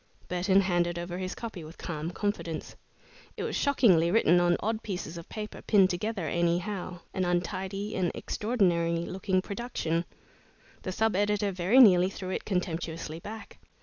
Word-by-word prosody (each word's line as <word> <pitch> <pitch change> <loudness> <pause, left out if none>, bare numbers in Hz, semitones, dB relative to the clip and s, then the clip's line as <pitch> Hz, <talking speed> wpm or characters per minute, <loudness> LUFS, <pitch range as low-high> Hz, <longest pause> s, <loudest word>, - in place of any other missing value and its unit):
Burton 185 +2 +3
handed 175 -2 +1
over 175 +1 -4
his 185 0 -4
copy 215 -7 -6
with 155 +2 -11
calm 160 -1 -4
confidence. 175 -4 -3 0.6
It - - -3
was - - -2
shockingly 200 - +4
written 175 -3 +4
on 175 0 +3
odd 220 +1 -1
pieces 180 -5 -5
of 170 -1 -9
paper, 215 -1 -6
pinned 195 -3 +4
together 190 -1 -2
anyhow 175 +3 -1
an 190 - 0
untidy 185 +3 -2
and 180 -3 +1
extraordinary 170 -7 0
looking 185 0 -1
production. 195 -7 -2 0.8
The 185 - -4
sub 220 +2 +1
editor 205 0 +1
very 185 +6 +2
nearly 185 -7 +7
threw 185 -1 -6
it - - -3
contemptuously 165 -4 -3
back. 220 +5 -9
185 Hz, 150 wpm, -29 LUFS, 170-205 Hz, 0.8 s, nearly